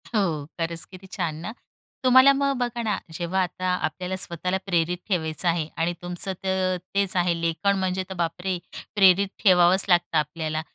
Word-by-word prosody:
हो. 165 -8 0
खरंच 165 0 -2
किती 190 +1 -13
छान 170 -5 -3
ना. 215 - -5 0.5
तुम्हाला 260 +2 +7
मग 275 0 +1
बघा 240 -1 -2
ना, 210 -3 0 0.2
जेव्हा 175 +3 -1
आता 185 +1 -4 0.2
आपल्याला 180 +4 -4
स्वतःला 180 0 -1
प्रेरित 175 -2 0
ठेवायचं 160 -2 -1
आहे 165 -2 +1
आणि 165 +2 0
तुमचं 180 +2 -3
तर 185 -1 0 0.2
तेच 200 -2 +1
आहे. 175 -1 +2
लेखन 170 +4 +1
म्हणजे 185 0 -1
तर 190 - -4
बापरे! 180 +3 -2 0.4
प्रेरित 195 -1 +5 0.2
ठेवावंच 185 -1 +5
लागतं 175 -2 +3
आपल्याला, 155 +1 -2
180 Hz, 160 wpm, -25 LUFS, 170-195 Hz, 0.5 s, तुम्हाला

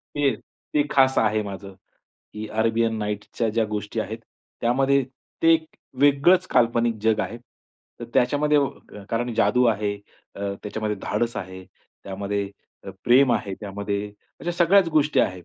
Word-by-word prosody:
ते 140 -5 +2 0.4
ते 150 - +3
खास 135 -1 +4
आहे 110 -1 +2
माझं, 100 -1 -8 0.6
की 110 0 -6
अरेबियन 115 +1 +1
नाईट्सच्या 105 +2 -3
ज्या 115 +1 +1
गोष्टी 105 +1 -3
आहेत. 110 +2 -5 0.4
त्यामध्ये 135 +3 +2 0.4
ते 165 - +6
एक 160 0 -1 0.4
वेगळंच 145 +6 +4
काल्पनिक 120 -1 +2
जग 110 -1 +2
आहे. 115 - -4 0.6
तर - - -4
त्याच्यामध्ये 145 +4 +3
व 140 -1 +2 0.4
कारण 120 +1 -1
जादू 110 +4 +3
आहे, 105 -2 0 0.4
अ, - - -10 0.2
त्याच्यामध्ये 105 0 -3
धाडस 120 0 -1
आहे, 95 0 -7 0.4
त्यामध्ये 100 +1 -3 0.3
अ, 100 - -6
प्रेम 125 +1 +5
आहे, 100 -4 -2
त्यामध्ये 100 0 -3 0.3
अशा 175 - -2
सगळ्याच 175 +2 +4
गोष्टी 155 -2 +2
आहेत 90 -2 -2
115 Hz, 145 wpm, -24 LUFS, 105-140 Hz, 0.6 s, ते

